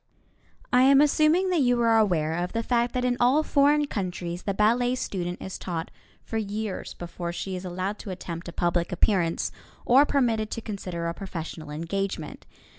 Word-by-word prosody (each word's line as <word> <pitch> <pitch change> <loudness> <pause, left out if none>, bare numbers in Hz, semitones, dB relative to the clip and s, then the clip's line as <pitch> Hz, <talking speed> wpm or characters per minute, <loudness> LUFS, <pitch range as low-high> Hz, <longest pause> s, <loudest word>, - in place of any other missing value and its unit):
I 250 - +6
am 270 +1 +6
assuming 310 +5 +4
that 345 -4 +2
you 245 -2 +3
are 230 -1 +4
aware 165 -7 +1
of 175 +1 -3
the 230 0 -1
fact 240 +1 0
that 250 0 0
in 245 -1 +1
all 260 +6 +4
foreign 290 0 +3
countries 180 -7 -4
the 200 - -2
ballet 240 +4 +3
student 180 -7 -3
is 190 - -6
taught 165 -3 -4 0.3
for 225 - -3
years 210 -1 -4
before 170 0 -5
she 185 +2 -4
is 180 +1 -6
allowed 185 +3 -3
to - - -8
attempt 175 -2 -6
a - - -6
public 175 0 0
appearance 180 -2 +1 0.3
or 270 +4 +6
permitted 230 -6 +1
to - - -4
consider 190 -6 -5
a 170 - -2
professional 165 -4 -7
engagement. 180 +6 -4
200 Hz, 180 wpm, -26 LUFS, 175-245 Hz, 0.3 s, I